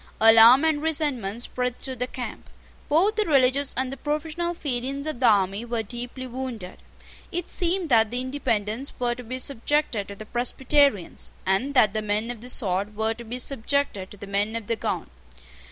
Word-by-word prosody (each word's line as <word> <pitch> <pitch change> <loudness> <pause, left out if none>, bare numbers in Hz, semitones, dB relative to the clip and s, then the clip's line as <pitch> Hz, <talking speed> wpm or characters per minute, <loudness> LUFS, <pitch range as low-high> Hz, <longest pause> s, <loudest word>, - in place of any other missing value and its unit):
Alarm 225 +5 +8
and 310 -2 +1
resentment 270 -9 -1
spread 250 -1 -2
through 260 -1 -6
the 250 +1 -2
camp. 250 -1 -7 0.4
Both 385 +9 +3
the 430 - +2
religious 275 -2 +3
and 260 0 0
the - - -7
professional 315 +4 -2
feelings 275 -1 -3
of 310 -6 -4
the 250 - +4
army 200 0 +3
were 235 -1 -2
deeply 245 +4 -6
wounded. 245 -7 -6 0.5
It 350 0 -3
seemed 350 -1 0
that 225 -3 +4
the 245 +2 -2
Independents 255 -2 -2
were 240 -1 0
to 250 +1 -9
be 255 +2 -5
subjected 260 -4 -1
to 200 - -8
the 215 - -9
Presbyterians, 245 - 0
and 220 +10 +1
that 215 -6 +5
the 215 - -1
men 215 +2 -1
of 235 -3 -9
the 250 - -8
sword 200 -2 -1
were 220 +1 0
to 235 +1 -10
be 235 +2 -5
subjected 255 -5 -1
to 205 - -12
the 200 - -8
men 200 +2 -1
of 230 -2 -4
the 230 - -1
gown. - - -3
245 Hz, 185 wpm, -25 LUFS, 220-280 Hz, 0.5 s, Alarm